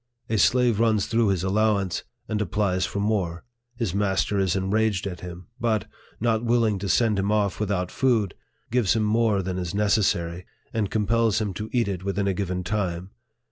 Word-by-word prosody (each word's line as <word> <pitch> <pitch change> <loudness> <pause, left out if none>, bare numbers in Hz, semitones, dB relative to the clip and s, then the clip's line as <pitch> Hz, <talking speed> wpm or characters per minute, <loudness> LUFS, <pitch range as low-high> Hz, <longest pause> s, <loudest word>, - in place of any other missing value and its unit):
A 110 - +2
slave 120 -3 +3
runs 110 -3 +3
through 115 -1 +2
his 95 -3 +1
allowance, 100 -1 +1 0.2
and 105 -1 -1
applies 100 -3 0
for 100 - -4
more. 100 -5 -1 0.3
His 115 -7 -2
master 100 0 +1
is 95 -2 +1
enraged 100 +1 +1
at 90 -3 -5
him; 90 0 -8
but, 110 -4 0 0.3
not 115 0 +1
willing 115 -4 +2
to 100 0 -3
send 110 +1 +3
him 100 +1 0
off 105 -3 +1
without 100 -4 -1
food, 115 -8 +1 0.4
gives 120 -4 +2
him 110 - +1
more 105 -2 +2
than 95 0 -3
is 90 0 -4
necessary, 90 -4 +1 0.3
and 110 -3 0
compels 110 0 +2
him 105 -3 -2
to 105 +4 -5
eat 120 -3 +1
it 95 -2 -3
within 100 0 -1
a 100 - +2
given 90 -1 -2
time. 95 -2 -2
100 Hz, 180 wpm, -25 LUFS, 95-110 Hz, 0.4 s, slave